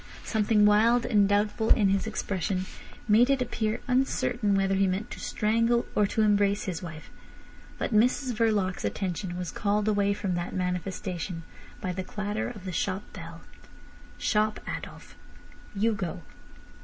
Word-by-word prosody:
Something 215 Hz, -1 st, +3 dB
wild 225 Hz, +4 st, +4 dB
and 205 Hz, -4 st, +3 dB
doubtful 210 Hz, +2 st, +1 dB
in 205 Hz, -4 st, +5 dB
his 195 Hz, +2 st, +1 dB
expression 190 Hz, -3 st, -2 dB, 0.4 s
made 230 Hz, +4 st, +5 dB
it 275 Hz, -1 st, +3 dB
appear 225 Hz, -3 st, -1 dB
uncertain 245 Hz, -4 st, +1 dB
whether 195 Hz, 0 st, +2 dB
he 195 Hz, 0 st, +3 dB
meant 190 Hz, +3 st, -2 dB
to -, -, -7 dB
strangle 230 Hz, +2 st, +1 dB
or 210 Hz, -, +3 dB
to 220 Hz, -, +1 dB
embrace 205 Hz, -1 st, +3 dB
his 180 Hz, -5 st, -4 dB
wife. 160 Hz, -3 st, -9 dB, 0.7 s
But -, -, -2 dB
Mrs 250 Hz, +4 st, +3 dB
Verloc's 210 Hz, -5 st, +1 dB
attention 175 Hz, -, -3 dB
was 180 Hz, -2 st, -4 dB
called 210 Hz, +1 st, 0 dB
away 200 Hz, -1 st, +2 dB
from 195 Hz, -3 st, -2 dB
that 175 Hz, 0 st, -3 dB
manifestation 180 Hz, -1 st, -3 dB, 0.4 s
by 185 Hz, -4 st, -2 dB
the 185 Hz, +1 st, -3 dB
clatter 210 Hz, +3 st, -3 dB
of 205 Hz, -6 st, -10 dB
the 185 Hz, -, -3 dB
shop 185 Hz, +3 st, -1 dB
bell. 165 Hz, -1 st, -9 dB, 0.8 s
"Shop, 215 Hz, -1 st, +1 dB
Adolf. -, -, -7 dB, 0.6 s
You 220 Hz, +3 st, +2 dB
go." 185 Hz, -4 st, -4 dB
205 Hz, 150 wpm, -28 LUFS, 185-220 Hz, 0.8 s, in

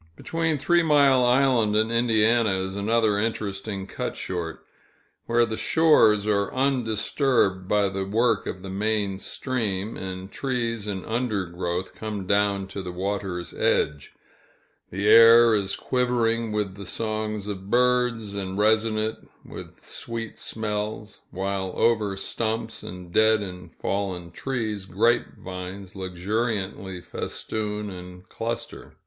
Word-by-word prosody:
Between 165 Hz, -, -1 dB
Three 175 Hz, +5 st, +3 dB
Mile 140 Hz, -5 st, +5 dB
Island 125 Hz, -4 st, +3 dB
and 110 Hz, +1 st, +2 dB
Indiana, 115 Hz, -2 st, +3 dB
is 95 Hz, 0 st, -3 dB
another 105 Hz, 0 st, +2 dB
interesting 100 Hz, -2 st, -3 dB
cut -, -, -5 dB
short, 85 Hz, -3 st, -5 dB, 0.6 s
where 120 Hz, 0 st, +3 dB
the 110 Hz, -1 st, -4 dB
shores 110 Hz, -11 st, +4 dB
are 100 Hz, -2 st, +1 dB
undisturbed 120 Hz, -5 st, +1 dB
by 105 Hz, 0 st, +3 dB
the 95 Hz, 0 st, -3 dB
work 110 Hz, +2 st, +1 dB
of 90 Hz, -, -5 dB
the 95 Hz, -, -6 dB
main 100 Hz, -1 st, -1 dB
stream, 110 Hz, -5 st, -2 dB
and 95 Hz, 0 st, -6 dB
trees 115 Hz, -5 st, -2 dB
and 95 Hz, -2 st, -4 dB
undergrowth 95 Hz, -6 st, -2 dB
come 105 Hz, -3 st, -5 dB
down 100 Hz, 0 st, +2 dB
to 100 Hz, -, -5 dB
the 90 Hz, -, -6 dB
water's 95 Hz, -1 st, -3 dB
edge; 75 Hz, -2 st, 0 dB, 0.8 s
the 100 Hz, +3 st, -2 dB
air 115 Hz, +1 st, +8 dB
is 100 Hz, -2 st, 0 dB
quivering 115 Hz, -3 st, 0 dB
with 105 Hz, -2 st, -1 dB
the 100 Hz, -1 st, -9 dB
songs 110 Hz, -1 st, -2 dB
of 95 Hz, -1 st, -6 dB
birds, 125 Hz, -3 st, +2 dB
and 95 Hz, -1 st, -4 dB
resonant 110 Hz, +1 st, +1 dB, 0.2 s
with -, -, -10 dB
sweet 115 Hz, -1 st, -6 dB
smells; 105 Hz, 0 st, -4 dB
while 95 Hz, 0 st, -3 dB
over 105 Hz, -4 st, +2 dB
stumps, 110 Hz, +2 st, -2 dB
and 90 Hz, -1 st, -9 dB
dead 110 Hz, -1 st, +4 dB
and 90 Hz, -2 st, -9 dB
fallen 95 Hz, -4 st, -3 dB
trees, 110 Hz, -2 st, -3 dB
grape 115 Hz, +6 st, +1 dB
vines 95 Hz, +1 st, -8 dB
luxuriantly 95 Hz, 0 st, -3 dB
festoon 105 Hz, +3 st, -4 dB
and 90 Hz, 0 st, -10 dB
cluster. 115 Hz, +1 st, -5 dB
105 Hz, 125 wpm, -25 LUFS, 95-115 Hz, 0.8 s, air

